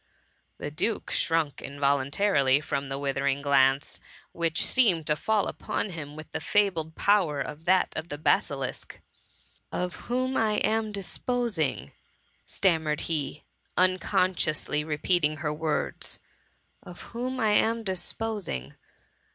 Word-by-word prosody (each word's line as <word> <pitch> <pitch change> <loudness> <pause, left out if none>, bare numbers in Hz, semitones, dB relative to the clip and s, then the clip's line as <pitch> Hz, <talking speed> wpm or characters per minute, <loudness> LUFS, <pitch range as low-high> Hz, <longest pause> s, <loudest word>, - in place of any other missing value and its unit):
The 145 - -5
duke 210 +9 -1
shrunk 165 -4 0
involuntarily 140 +1 +2
from 140 -2 -3
the 135 - -3
withering 140 0 -1
glance, 135 0 +3 0.3
which 165 -2 +1
seemed 195 -11 +3
to 150 - +2
fail! 215 +5 +1
upon 205 - -3
him 150 -3 -7
with 155 0 -10
the - - -3
fabled 165 -4 +1
power 185 -8 +3
of 150 +3 -5
that 185 +1 +3
of 160 +2 -4
the 145 - -4
basilisk. 140 -3 -1 0.7
^VOf 180 0 -2
whom 255 +2 0
I 220 -1 +2
am 220 +1 +1
disposing?^* 200 - -1 0.6
stammered 160 -5 +1
he, 150 -2 -3 0.3
unconsciously 185 -5 +2
repeating 155 0 +1
her 150 0 -2
words, 155 0 -1 0.3
" - - -42
Of 175 - -11
whom 255 +2 -4
I 220 -3 +3
am 225 +2 +3
disposing 190 - -3
160 Hz, 125 wpm, -27 LUFS, 145-200 Hz, 0.7 s, glance